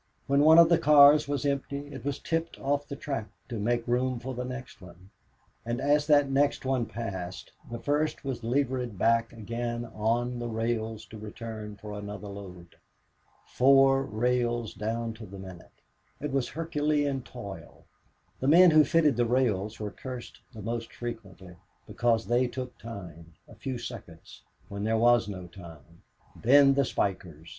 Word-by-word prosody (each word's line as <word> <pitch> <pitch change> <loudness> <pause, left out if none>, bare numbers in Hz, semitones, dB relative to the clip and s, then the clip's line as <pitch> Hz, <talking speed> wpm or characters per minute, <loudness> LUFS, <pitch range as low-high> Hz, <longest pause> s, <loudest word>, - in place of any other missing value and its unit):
When 140 +1 +2
one 160 +2 +7
of 170 -1 +9
the 170 0 +4
cars 150 0 +7
was 145 0 -2
empty 140 0 -2
it 130 -4 -8
was 140 -1 -2
tipped 165 0 -3
off 145 +1 -1
the 140 - -6
track 135 -6 -4 0.2
to 115 -3 -4
make 120 +2 0
room 125 +1 0
for 130 +2 -6
the 125 0 -4
next 125 -3 -8
one. 90 +2 -15 0.5
And 120 +1 -3
as 145 +2 +2
that 145 -2 +5
next 135 0 +1
one 130 -3 0
passed 95 -5 -6 0.2
the 120 - -5
first 145 +4 -1
was 130 -4 -4
levered 125 -2 -1
back 115 +3 +2
again 120 +1 -4
on 120 +3 -1
the 120 - -3
rails 110 -1 -2
to 110 +2 -11
return 110 0 -7
for 105 +1 -9
another 105 0 -7
load. 90 -4 -11 0.7
Four 135 +1 +5
rails 120 -1 -1
down 115 +3 -3
to 110 -1 -10
the 100 +1 -10
minute! 95 -3 -12 0.4
It 145 0 -4
was 135 -2 0
Herculean 150 -3 -1
toil. 100 -6 -10 0.5
The 130 - -2
men 175 +4 +7
who 155 -1 +7
fitted 155 -5 +3
the 120 -1 +2
rails 115 -4 0
were 105 -1 -4
cursed 125 -2 -8
the 110 -5 -10
most 115 +1 -4
frequently, 100 -6 -8 0.3
because 115 -2 0
they 120 +2 +2
took 125 0 -6
time, 85 -7 -10
a - - -14
few 130 -2 -5
seconds, 100 - -10 0.3
when 100 0 -6
there 110 +1 +1
was 120 -1 +4
no 95 -3 -6
time. 85 -2 -14 0.3
Then 135 +3 +5
the 140 0 +2
spikers! 85 -8 -3
120 Hz, 165 wpm, -28 LUFS, 105-135 Hz, 0.7 s, of